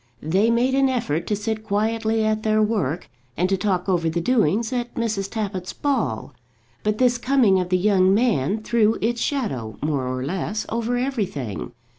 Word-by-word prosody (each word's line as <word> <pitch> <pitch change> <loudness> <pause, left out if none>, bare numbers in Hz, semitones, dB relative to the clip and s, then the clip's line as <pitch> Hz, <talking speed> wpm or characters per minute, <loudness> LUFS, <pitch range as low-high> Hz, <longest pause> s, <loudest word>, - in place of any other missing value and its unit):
They 190 +9 +2
made 240 +3 +2
an 270 0 +3
effort 230 - -1
to 210 - +1
sit 215 +1 -3
quietly 220 +1 0
at 215 0 +1
their 215 0 +2
work, 200 - 0 0.3
and 180 - +2
to 195 - +3
talk 190 -2 -1
over 170 -4 +1
the 165 +2 -1
doings 220 - +1
at 240 -1 -3
Mrs. 215 -4 -1
Tappitt's 195 -5 -4
ball; 255 - -1 0.5
but 210 0 0
this 245 -1 +3
coming 245 -7 +3
of 180 -1 -2
the 185 - +3
young 190 -1 +3
man 210 - +1
threw 225 -1 +2
its 235 +2 -1
shadow, 135 - -2
more 145 -4 -1
or 130 0 -3
less, 195 +6 -2
over 235 +2 -1
everything. 200 - -3
215 Hz, 175 wpm, -23 LUFS, 180-235 Hz, 0.5 s, an